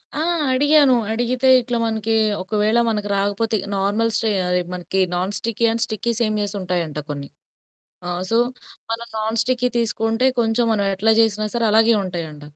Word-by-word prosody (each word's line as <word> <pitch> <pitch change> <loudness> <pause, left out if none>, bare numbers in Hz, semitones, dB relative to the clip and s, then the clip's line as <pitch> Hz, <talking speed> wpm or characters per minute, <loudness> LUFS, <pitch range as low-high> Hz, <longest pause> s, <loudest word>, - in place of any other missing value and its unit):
ఆ! - - -2 0.3
అడిగాను. 290 +1 +4 0.2
అడిగితే 245 +3 0
ఇట్లా 240 0 -3
మనకి 220 0 -1 0.3
ఒకవేళ 215 +3 +1
మనకు 210 -2 -2
రాకపోతే 205 +3 0 0.2
నార్మల్‌‌‌ 205 +4 0
స్ట్రే 225 - 0 0.2
అయి 180 0 +1
మనకి 180 +1 -3 0.2
నాన్ 185 +3 -2
స్టిక్కీ 230 +3 -1
అండ్ 230 0 -2
స్టిక్కీ 220 +2 -2
సేమియాస్ 210 -2 -1
ఉంటాయంట 170 -5 -2
కొన్ని. 140 -1 -5 0.8
ఆ! - - -2 0.2
సో 230 - +2 0.5
మనం 230 +1 -3
నాన్ 220 +1 -2
స్టిక్కీ 250 0 0
తీసుకుంటే 225 +1 0
కొంచెం 230 +1 +1
మనమెట్లా 200 +1 +1
జేసినా 215 -1 +2
సరే 235 - 0
అలాగే 225 +2 +4
ఉంటాయంట. 160 -5 -6
220 Hz, 150 wpm, -19 LUFS, 195-230 Hz, 0.8 s, అడిగాను